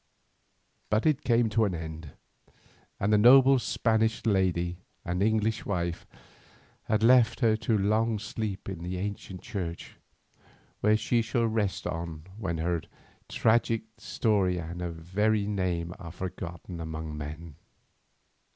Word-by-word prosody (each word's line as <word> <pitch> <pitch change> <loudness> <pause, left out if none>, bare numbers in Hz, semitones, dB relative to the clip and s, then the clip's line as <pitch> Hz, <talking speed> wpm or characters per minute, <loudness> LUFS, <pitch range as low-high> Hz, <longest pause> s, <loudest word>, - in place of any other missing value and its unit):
But 110 +1 +1
it 155 -2 +2
came 120 -1 +3
to 115 +1 +2
an 100 -4 0
end, 80 -2 -7 0.9
and 105 +2 +1
the 105 - +5
noble 130 +3 +7
Spanish 110 -1 0
lady 90 -4 +1 0.3
and 90 +2 -2
English 110 +1 +1
wife 85 -3 -3 0.8
was 110 0 +2
left 120 -1 +5
to 110 -4 +3
her 110 0 +2
long 110 +3 +1
sleep 105 -2 -5
in 95 -4 -5
the 90 +1 -4
ancient 95 -1 -5
church, 90 -7 -5 0.8
where 105 +1 +4
she 120 +2 +1
shall 115 +1 0
rest 110 -5 -1
on 80 -2 -5
when 95 -6 -3
her 85 +1 -1 0.5
tragic 115 0 +2 0.2
story 100 -5 +1
and 85 +1 -6
her 90 - -2
very 100 +6 0
name 90 -4 -2
are 85 -3 -8
forgotten 85 -1 -6
among 80 -1 -5
men. 75 +1 -7
100 Hz, 135 wpm, -28 LUFS, 85-110 Hz, 0.9 s, noble